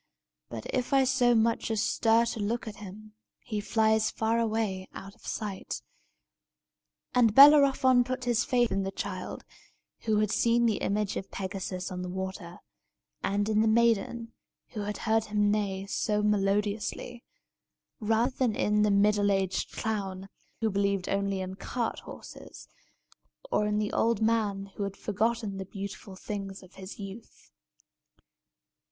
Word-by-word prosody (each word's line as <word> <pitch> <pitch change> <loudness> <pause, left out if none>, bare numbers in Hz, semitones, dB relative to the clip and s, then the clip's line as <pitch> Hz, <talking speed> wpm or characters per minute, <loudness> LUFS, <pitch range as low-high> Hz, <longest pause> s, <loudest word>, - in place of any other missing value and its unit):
But, 115 -2 -7
if 255 +1 -1
I 270 -1 +5
so 250 -2 +3
much 230 +1 +1
as 220 -1 0
stir 225 +1 +3
to 230 - -4
look 225 +3 -2
at 215 - -7
him, 210 +1 -11 0.3
he 210 -2 -4
flies 220 0 +2
far 225 +1 0
away 215 -4 -1
out 195 +1 -9
of - - -16
sight." 205 -3 -4 1.3
And 230 -4 +4
Bellerophon 275 -3 +7
put 255 +1 -4
his 240 -2 +2
faith 245 -2 +2
in 195 - 0
the 195 - -2
child, - - -5 0.6
who 215 -2 +2
had 210 -1 +1
seen 235 +1 +3
the 220 -3 +2
image 205 0 -1
of 195 - -6
Pegasus 190 -1 -4
in 180 0 -4
the 180 - -4
water, 190 -1 -5 0.7
and 205 +1 0
in 215 0 +2
the 220 - +3
maiden, 230 +1 +1 0.4
who 215 - -7
had 205 0 -3
heard 220 0 +2
him 210 -1 +1
neigh 195 -2 -1
so 210 +1 -1
melodiously, 210 +3 -1 0.8
rather 225 +3 +1
than 245 -5 +1
in 210 0 +2
the 210 - +3
middle 205 0 +3
aged 190 -1 -1
clown, 195 -3 -3 0.3
who 220 -1 +1
believed 200 -1 0
only 195 -1 0
in 185 0 -5
cart 240 +1 -3
horses, - - -11 0.8
or 210 - +2
in 210 0 0
the 210 0 -1
old 230 0 +2
man 215 -3 +1
who - - -4
had 195 0 -4
forgotten 215 0 -1
the 190 - -5
beautiful 195 0 -8
things 195 0 -6
of 185 0 -17
his 190 0 -9
youth. 200 +2 -10
210 Hz, 155 wpm, -29 LUFS, 195-230 Hz, 1.3 s, Bellerophon